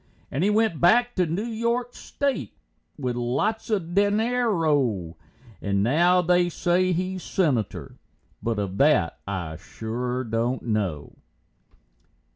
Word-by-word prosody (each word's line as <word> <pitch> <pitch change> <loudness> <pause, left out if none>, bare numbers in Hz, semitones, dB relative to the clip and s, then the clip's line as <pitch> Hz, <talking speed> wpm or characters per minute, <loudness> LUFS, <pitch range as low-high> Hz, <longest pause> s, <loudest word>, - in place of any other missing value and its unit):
And 140 +7 -1
he 200 - +3
went 215 -5 +1
back 240 +8 +4
to 180 -2 +2
Noo 170 +7 -2
York 235 +2 -1
State 280 -1 -3 0.4
with 125 -4 -2
lots 140 - -1
of 180 -6 -1
dinero, 185 - +1 0.5
And 100 -1 0
now 175 - +4
they 175 0 +3
say 180 +2 +1
he's 185 +1 -2
senator, 140 - -1 0.4
but 115 -1 -1
of 100 -2 -3
that 140 - +3
I 85 -5 -4
shore 120 +7 -4
don't 115 +2 -1
know. 100 -10 -2
165 Hz, 120 wpm, -25 LUFS, -, 0.5 s, back